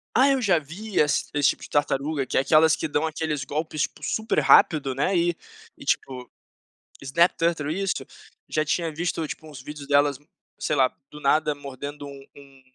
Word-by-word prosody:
Ah, 265 +2 +6
eu 270 -2 +2
já 185 -7 +3
vi 185 +8 -5
ess 150 -1 +2
esse 145 -2 +3
tipo - - -11
de - - -10
tartaruga 145 0 0
que - - -2
é - - +5
aquelas 160 +2 +5
que - - -4
dão 150 +2 0
aqueles 155 -3 -3
golpes, 155 +1 -2
tipo, 150 - -6
super 220 +6 0
rápido, 140 -5 +5
né, 165 +8 0
e 175 0 +2 0.4
e - - -12
tipo, 125 -2 -2 0.7
snap 170 +6 +3
turtle, 160 -3 0
isso, 195 +3 -2 0.4
já 155 0 0
tinha 165 +1 -1
visto 165 0 -2
tipo 155 +1 -8
uns 135 -3 -10
vídeos 145 0 -9
delas, 145 -1 +3 0.4
sei 150 - -1
lá, 130 -2 +3 0.2
do 150 0 -12
nada 150 +1 +2
mordendo 145 +1 -8
um 140 -1 -10
um 140 -1 -16
150 Hz, 190 wpm, -25 LUFS, 140-165 Hz, 0.7 s, Ah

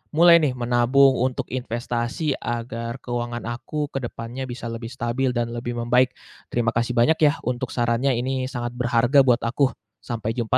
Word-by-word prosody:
mulai 170 +1 +7
nih 145 -4 +1
menabung 125 +3 +4
untuk 130 -1 -2
investasi 120 +4 -2
agar 115 +1 -4
keuangan 120 -1 -3
aku 120 +5 -6 0.2
ke 135 - -1
depannya 120 +3 -6
bisa 120 0 -7
lebih 115 0 -6
stabil 125 +1 -1
dan 115 0 -1
lebih 120 0 -4
membaik. 125 +2 +3 0.4
Terima 120 -1 0
kasih 120 +1 0
banyak 155 +7 +4
yah, - - -2
untuk 125 0 -2
sarannya, 120 +3 +1
ini 130 +1 -2
sangat 120 -2 -4
berharga 120 +2 +3
buat 125 -3 +3
aku. 120 +5 +2 0.4
Sampai 115 -1 -3
jumpa 120 +2 +1
120 Hz, 165 wpm, -23 LUFS, 120-130 Hz, 0.4 s, mulai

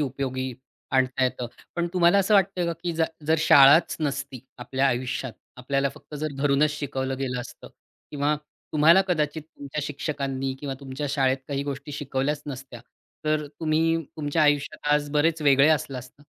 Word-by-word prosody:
उपयोगी 130 -2 -2 0.4
आणता 130 0 +2
येतं. 125 -1 -2 0.3
पण 170 0 0
तुम्हाला 180 +2 +4
असं 200 +2 +3
वाटतंय 190 -2 +3
का, 170 - 0
की 170 +1 -4
ज 165 - +2 0.2
जर 160 - +4
शाळाच 145 +1 +6
नसती 135 -4 -3 0.2
आपल्या 130 +2 0
आयुष्यात, 125 0 -2 0.2
आपल्याला 135 +2 0
फक्त 150 0 -13
जर 150 0 -3
धरूनच 145 +1 +3
शिकवलं 135 -3 -3
गेलं 125 -2 -2
असतं, 120 - -11 0.4
किंवा 145 +1 +1 0.4
तुम्हाला 165 +5 +6
कदाचित 155 -2 0
तुमच्या 150 -1 -7
शिक्षकांनी 135 -2 -3
किंवा 140 -2 -4
तुमच्या 140 +2 -5
शाळेत 135 -1 +2
काही 140 0 -2
गोष्टी 140 +1 -6
शिकवल्याच 145 +1 -2
नसत्या. 130 -3 -8 0.4
तर 155 -1 0
तुम्ही 160 +1 +2 0.2
तुमच्या 155 +1 0
आयुष्यात 145 0 +1
आज 145 0 0
बरेच 155 +1 +1
वेगळे 140 +1 +5
असला 140 -4 +1
असता? 125 +3 -13
145 Hz, 160 wpm, -25 LUFS, 135-155 Hz, 0.4 s, शाळाच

